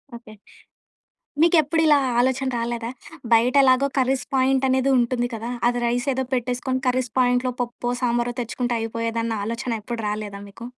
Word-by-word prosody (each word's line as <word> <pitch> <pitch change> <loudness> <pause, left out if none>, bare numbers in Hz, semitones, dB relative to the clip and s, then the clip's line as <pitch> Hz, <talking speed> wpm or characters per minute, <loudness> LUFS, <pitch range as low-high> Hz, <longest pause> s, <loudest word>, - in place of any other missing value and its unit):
Okay. 235 -2 -12 1.1
మీకు 340 +1 +5
ఎప్పుడిలా 310 0 +3 0.2
ఆలోచన 260 +1 +1
రాలేదా? 235 0 -3 0.4
బయట 230 +3 +4
ఎలాగో 260 +1 +4
కర్రీస్ 260 -1 +1
పాయింట్ 265 0 +2
అనేది 260 +1 +2
ఉంటుంది 245 0 0
కదా! 225 +2 -5 0.2
అది 245 0 -1
రైస్ 245 +2 -1
ఏదో 265 +1 -1
పెట్టేసుకొని 255 +1 -2
కర్రీస్ 250 -1 0
పాయింట్లో 250 0 +2
పప్పో, 240 0 -4
సాంబారో 240 0 0
తెచ్చుకుంటే 240 +1 -2
అయిపోయేదన్న 230 -1 -2
ఆలోచన 230 0 -3
ఎప్పుడు 235 +2 -5
రాలేదా 210 -1 -5
మీకు? 230 +4 -10
245 Hz, 145 wpm, -23 LUFS, 230-260 Hz, 1.1 s, మీకు